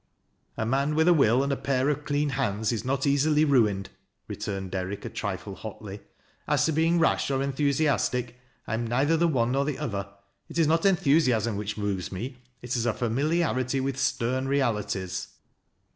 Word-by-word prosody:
"A 110 - -1
man 140 +5 +1
with 160 +2 +3
a 175 - +7
will 130 -4 +4
and 140 0 0
a - - +1
pair 135 -1 0
of 150 0 -2
clean 145 0 0
hands 105 -4 -1
is 115 - -2
not 135 +1 -1
easily 150 +2 +3
ruined," 105 -9 +2 0.4
returned 95 -2 -5
Derrick 95 +1 -4
a - - -3
trifle - - -4
hotly. - - -8 0.5
"As - - +2
to 160 - +1
Ixiiiig 165 +3 +2
rash 165 - +2
or 135 -1 0
enthusiastic, 140 -3 0 0.3
I - - -4
apa 115 +1 -1
neither 140 +7 +2
the 170 +1 +3
one 125 -6 +1
nor 135 +2 +1
the 145 -1 -2
other. 100 -9 -3 0.4
It - - -7
is 165 - +4
not 165 +4 +3
enthusiasm 135 - +2
which 105 +1 -4
moves 100 -3 -2
me, 120 +8 -5 0.3
it 125 0 -2
is 120 -1 0
a 115 - +2
familiarity 135 +1 0
with 135 0 -2
stern 130 +1 0
realities." 105 -9 -1
130 Hz, 180 wpm, -27 LUFS, 110-145 Hz, 0.5 s, a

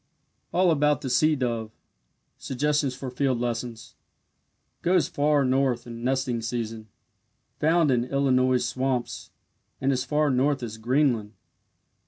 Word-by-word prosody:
ALL 180 -1 +3
ABOUT 150 -1 +2
THE 130 - -3
SEA 155 +5 +3
DOVE 115 -5 -2 0.7
SUGGESTIONS 145 0 0
FOR 130 -1 -6
FIELD 130 0 0
LESSONS 120 -1 -4 0.9
Goes 180 0 +2
far 145 -1 +2
north 130 -2 +1
in 115 -1 -8
nesting 130 -2 0
season. 115 -1 -4 0.7
Found 160 -1 +3
in 120 -1 +1
Illinois 130 -1 +2
swamps, 125 -1 -2 0.5
and 135 +1 +1
as 130 -1 0
far 150 +2 +1
north 135 +1 +1
as 110 -1 -6
Greenland. 120 -3 +1
130 Hz, 125 wpm, -26 LUFS, 120-145 Hz, 0.9 s, ALL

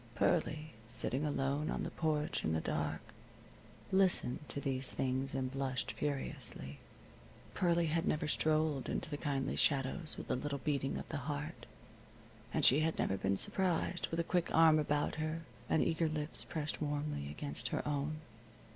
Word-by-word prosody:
Pearlie, 155 -2 +1
sitting 125 +3 -1
alone 145 0 0
on - - -1
the - - -3
porch 155 -2 0
in 80 - +1
the 80 - +2
dark, - - -1 0.9
listened 190 -9 +3
to - - -3
these 135 -1 0
things 130 +1 0
and 130 -1 -1
blushed 135 -2 -1
furiously. 130 - -3 0.7
Pearlie 170 -1 +3
had 165 +1 0
never 155 0 +1
strolled 155 -2 +2
into - - -2
the - - -1
kindly 140 -2 -1
shadows 145 +4 +1
with - - -5
a - - +3
little 140 +2 -2
beating 140 -1 -1
of - - -6
the 155 - -2
heart, 145 +3 -4 0.8
and - - +2
she 135 - +7
had 160 +1 +1
never 95 - +1
been 95 0 +1
surprised 180 - +1
with 165 - -3
a - - +3
quick 175 0 +1
arm 160 -1 +7
about 145 -1 +1
her 155 +1 -2 0.3
and 160 - +4
eager 165 -1 +1
lips 155 0 -2
pressed 155 -1 -3
warmly 145 - -2
against 75 0 -4
her - - -2
own. 150 +1 -1
150 Hz, 165 wpm, -35 LUFS, 135-155 Hz, 0.9 s, she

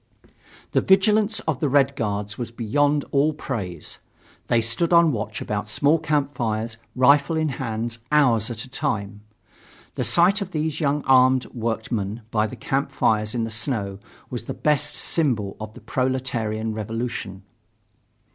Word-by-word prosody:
The - - +3
vigilance 210 +3 +3
of 150 -5 -2
the 150 - +1
Red 135 0 +3
Guards 105 -2 -2
was 120 -1 -5
beyond 145 +6 +1
all 145 +3 +3
praise. 100 - -5 0.5
They 120 - +3
stood 115 +10 -1
on 170 -2 +6
watch 110 -4 -4
about 105 0 -3
small 145 +8 +3
camp 150 -3 0
fires, 115 -1 -2 0.2
rifle 140 +5 +4
in 155 -1 +1
hand, 115 -3 -3
hours 125 -7 +3
at 115 -1 -5
a - - -11
time. 105 -5 -3 0.7
The - - -2
sight 185 +5 +3
of 190 -2 -5
these 155 -1 -1
young 145 -1 0
armed 130 -1 +5
workmen 110 -2 -3
by 110 -1 +2
the - - -8
camp 140 -3 -2
fires 110 -3 +1
in 115 - 0
the 115 - -3
snow 105 -4 -1 0.3
was 120 -3 -5
the - - -5
best 150 0 +1
symbol 115 -12 0
of 110 0 -8
the - - -12
proletarian 115 -3 -1
revolution. 110 -3 -4
125 Hz, 155 wpm, -23 LUFS, 110-145 Hz, 0.7 s, on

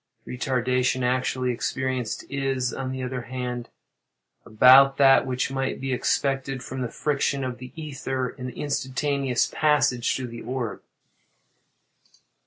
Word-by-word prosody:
The - - -6
retardation 125 0 0
actually 130 0 0
experienced 130 -1 -2
is, 135 -3 -1
on 130 -1 -4
the 130 0 -4
other 125 0 -3
hand, 125 0 -5 0.8
about 130 +5 +7
that 135 -1 +6
which 130 0 -1
might 135 0 -2
be 135 0 -2
expected 135 0 -1
from 130 0 -5
the 125 - -1
friction 140 -1 -1
of 125 -1 -4
the 125 0 -9
ether 135 -4 -3
in 125 +1 -7
the 125 - -9
instantaneous 140 -2 0
passage 150 -6 +2
through 130 -2 -4
the 115 0 -8
orb. 125 -2 -4
130 Hz, 135 wpm, -25 LUFS, 125-135 Hz, 0.8 s, about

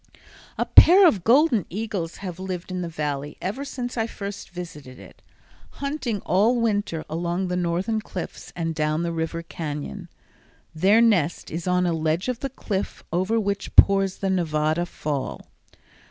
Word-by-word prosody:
A - - +1
pair 375 +3 +8
of 200 - +1
golden 245 - +4
eagles 200 -4 -4
have 180 -1 -6
lived 185 -1 -5
in 180 0 -3
the 170 - -4
Valley 145 -2 -4
ever 205 +10 -3
since 250 -3 -5
I 225 0 0
first 200 -3 -7
visited 150 -8 -9
it, - - -15 0.5
hunting 280 -7 -3
all 220 +7 +2
winter 205 -8 -1
along 175 +3 -2
the 180 - -1
northern 180 +5 -1
cliffs 185 -4 -7
and 165 -1 -2
down 155 +1 0
the 170 - -1
river 165 0 -3
cañon. 165 +3 -6 0.7
Their 195 +8 +4
nest 180 -9 +2
is 165 +2 -4
on 180 0 +2
a 175 - +1
ledge 160 +6 0
of 250 -2 -2
the 275 - -3
cliff 205 -6 -4
over 190 +6 +1
which 200 -1 -3
pours 195 -1 +6
the 195 -1 -1
Nevada 160 -1 0
Fall. 145 -5 -4
180 Hz, 160 wpm, -24 LUFS, 165-215 Hz, 0.7 s, pair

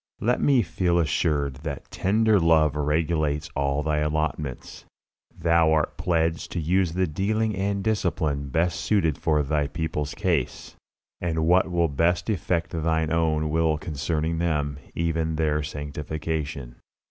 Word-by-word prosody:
Let 120 +3 +1
me 135 -5 +4
feel 85 +1 0
assured 70 -3 0
that 70 -1 -7
tender 110 +2 +2
love 80 -3 +3
regulates 75 0 0
all 70 +1 0
Thy 75 0 0
allotments. 75 -3 -3 0.5
Thou 85 -1 +3
art 80 -1 +1
pledged 80 -1 0
to 90 - -1
use 85 +1 +1
the 95 +1 +1
dealing 105 +6 -1
and 100 +1 -1
discipline 80 -9 -1
best 85 +5 0
suited 90 -8 +1
for 75 -1 +1
Thy 75 0 0
people's 75 -2 -3
case, 85 -10 -1 0.5
and 80 -2 0
what 90 +2 +4
will 85 -1 +2
best 85 +8 +1
effect 85 -3 -1
Thine 80 -1 0
own 80 -2 +1
will 80 -1 +2
concerning 80 +2 -2
them, 75 -4 -1 0.2
even 80 -1 -1
their 75 -1 +1
sanctification. 75 -2 -4
80 Hz, 135 wpm, -25 LUFS, 75-85 Hz, 0.5 s, me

